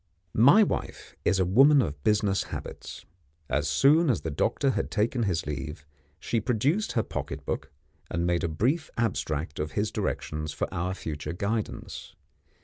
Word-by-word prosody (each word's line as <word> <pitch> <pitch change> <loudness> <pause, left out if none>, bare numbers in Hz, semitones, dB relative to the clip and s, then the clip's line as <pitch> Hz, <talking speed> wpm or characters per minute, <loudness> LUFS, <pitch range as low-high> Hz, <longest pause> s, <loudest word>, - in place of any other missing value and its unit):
My 140 - +7
wife - - -4
is 95 - +2
a 95 - +3
woman 135 +10 +6
of 75 - -2
business 105 -2 +2
habits. - - -8 0.4
As 75 0 0
soon 145 - +4
as 120 - +1
the 80 - -3
doctor 130 - +1
had - - -2
taken 115 +3 0
his 90 -7 0
leave, 75 +1 -5 0.3
she 115 +4 -1
produced 140 - +1
her 115 - +1
pocket 70 -6 -5
book, - - -3 0.4
and 85 0 -1
made 85 -1 +1
a - - +2
brief 130 - 0
abstract 80 -9 -1
of 75 0 -3
his 105 +1 0
directions 75 -7 -3
for - - -2
our 90 +2 -2
future 75 -2 -5
guidance. 105 +4 -4
100 Hz, 160 wpm, -27 LUFS, 75-120 Hz, 0.4 s, My